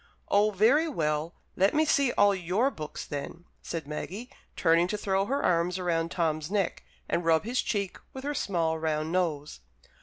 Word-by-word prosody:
"Oh, 205 Hz, +1 st, +4 dB
very 230 Hz, -, +3 dB
well! 155 Hz, -, -1 dB, 0.2 s
Let 195 Hz, +7 st, +3 dB
me 310 Hz, +1 st, +4 dB
see 280 Hz, -4 st, +3 dB
all 205 Hz, 0 st, +5 dB
your 190 Hz, +8 st, +1 dB
books, 150 Hz, -, -7 dB
then," 145 Hz, +4 st, -6 dB, 0.2 s
said 165 Hz, -3 st, -5 dB
Maggie, 195 Hz, -, -6 dB, 0.2 s
turning 165 Hz, 0 st, +3 dB
to 210 Hz, -, -2 dB
throw 195 Hz, -1 st, 0 dB
her 275 Hz, +4 st, -1 dB
arms 175 Hz, +1 st, +1 dB
round 165 Hz, -2 st, 0 dB
Tom's 155 Hz, -3 st, -1 dB
neck, 200 Hz, -3 st, -1 dB, 0.2 s
and 175 Hz, -, 0 dB
rub 165 Hz, -1 st, +3 dB
his 240 Hz, +4 st, 0 dB
cheek 200 Hz, -3 st, -2 dB
with 265 Hz, -, -8 dB
her 290 Hz, +1 st, -2 dB
small, 165 Hz, -, 0 dB
round 155 Hz, 0 st, -1 dB
nose. 155 Hz, -, -1 dB
180 Hz, 175 wpm, -28 LUFS, 160-210 Hz, 0.2 s, all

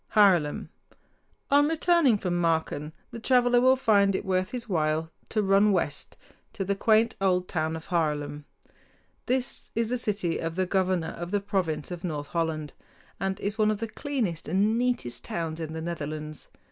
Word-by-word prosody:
HAARLEM 180 Hz, -8 st, +4 dB, 0.8 s
On 290 Hz, +1 st, +5 dB
returning 325 Hz, -6 st, +3 dB
from 180 Hz, -3 st, -2 dB
Marken 160 Hz, -2 st, 0 dB, 0.2 s
the 230 Hz, -, -7 dB
traveler 245 Hz, +1 st, +4 dB
will 260 Hz, +1 st, +6 dB
find 205 Hz, -6 st, +3 dB
it -, -, -3 dB
worth 185 Hz, -1 st, 0 dB
his 245 Hz, -2 st, -5 dB
while 160 Hz, -3 st, 0 dB, 0.2 s
to 215 Hz, -2 st, +1 dB
run 195 Hz, +2 st, +4 dB
west 165 Hz, -6 st, -2 dB, 0.4 s
to 195 Hz, -, -3 dB
the 200 Hz, -, +1 dB
quaint 220 Hz, +3 st, +3 dB
old 180 Hz, -2 st, +2 dB
town 160 Hz, -1 st, -1 dB
of 160 Hz, -, -8 dB
Haarlem 160 Hz, -4 st, +1 dB
(hahr´ -, -, -5 dB
lem). 145 Hz, 0 st, -7 dB, 0.8 s
This 255 Hz, +1 st, -1 dB
is 230 Hz, 0 st, 0 dB
the 250 Hz, -, 0 dB
city 200 Hz, -7 st, -1 dB
of 165 Hz, 0 st, -3 dB
the 185 Hz, 0 st, +1 dB
governor 185 Hz, -3 st, 0 dB
of 175 Hz, 0 st, -6 dB
the 205 Hz, +2 st, +1 dB
province 180 Hz, -6 st, -2 dB
of 175 Hz, -1 st, -6 dB
North 150 Hz, -5 st, -4 dB
Holland, 160 Hz, -3 st, -2 dB, 0.5 s
and 195 Hz, +1 st, -2 dB
is 205 Hz, +2 st, -3 dB
one 215 Hz, 0 st, +4 dB
of 215 Hz, -, 0 dB
the 225 Hz, +2 st, -3 dB
cleanest 225 Hz, -, -3 dB
and 200 Hz, +7 st, +2 dB
neatest 240 Hz, -, -1 dB
towns 165 Hz, -1 st, -4 dB
in 160 Hz, -1 st, -5 dB
the 160 Hz, -, -4 dB
Netherlands. 155 Hz, -2 st, -5 dB
185 Hz, 180 wpm, -27 LUFS, 160-220 Hz, 0.8 s, will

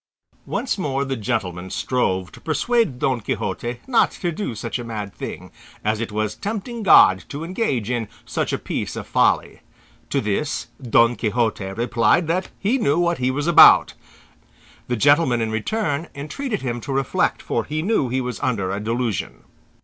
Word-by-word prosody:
Once 255 Hz, -5 st, -2 dB
more 140 Hz, -5 st, -1 dB
the 135 Hz, -1 st, -2 dB
gentleman 95 Hz, -6 st, -3 dB
strove 95 Hz, 0 st, -1 dB
to 120 Hz, -, -14 dB
persuade 225 Hz, -, +1 dB
Don 125 Hz, -2 st, 0 dB
Quixote 120 Hz, +3 st, -3 dB
not 250 Hz, -3 st, +3 dB
to 175 Hz, -, -3 dB
do 165 Hz, -, -4 dB
such 115 Hz, +3 st, -4 dB
a -, -, -5 dB
mad 105 Hz, -4 st, -5 dB
thing, -, -, -7 dB, 0.3 s
as 110 Hz, 0 st, +1 dB
it 115 Hz, -, -3 dB
was 105 Hz, 0 st, -1 dB
tempting 220 Hz, -, -5 dB
God 95 Hz, -, +6 dB
to 145 Hz, +3 st, -5 dB
engage 165 Hz, -, -1 dB
in 120 Hz, -3 st, -1 dB, 0.2 s
such -, -, -2 dB
a -, -, 0 dB
piece -, -, -4 dB
of -, -, -5 dB
folly. -, -, +1 dB, 0.5 s
To -, -, +1 dB
this, 105 Hz, +8 st, -2 dB
Don 120 Hz, -1 st, +3 dB
Quixote 110 Hz, -2 st, -1 dB
replied 120 Hz, -, +2 dB
that 180 Hz, +3 st, -1 dB
he 230 Hz, +7 st, 0 dB
knew 145 Hz, -, +2 dB
what 170 Hz, -2 st, +1 dB
he 125 Hz, 0 st, +1 dB
was 145 Hz, +3 st, -2 dB
about. 170 Hz, -, +7 dB, 0.9 s
The 125 Hz, -, 0 dB
gentleman 145 Hz, 0 st, +4 dB
in 110 Hz, -1 st, -1 dB
return 150 Hz, -, -1 dB
entreated 185 Hz, -, -4 dB
him 120 Hz, -2 st, -3 dB
to 140 Hz, -, -6 dB
reflect, 135 Hz, -1 st, 0 dB
for -, -, -1 dB
he 155 Hz, +1 st, -3 dB
knew 190 Hz, -, +1 dB
he 130 Hz, +2 st, 0 dB
was 125 Hz, -3 st, -4 dB
under 100 Hz, -7 st, -1 dB
a 100 Hz, -, -2 dB
delusion. 115 Hz, -, -3 dB
125 Hz, 170 wpm, -22 LUFS, 110-165 Hz, 0.9 s, about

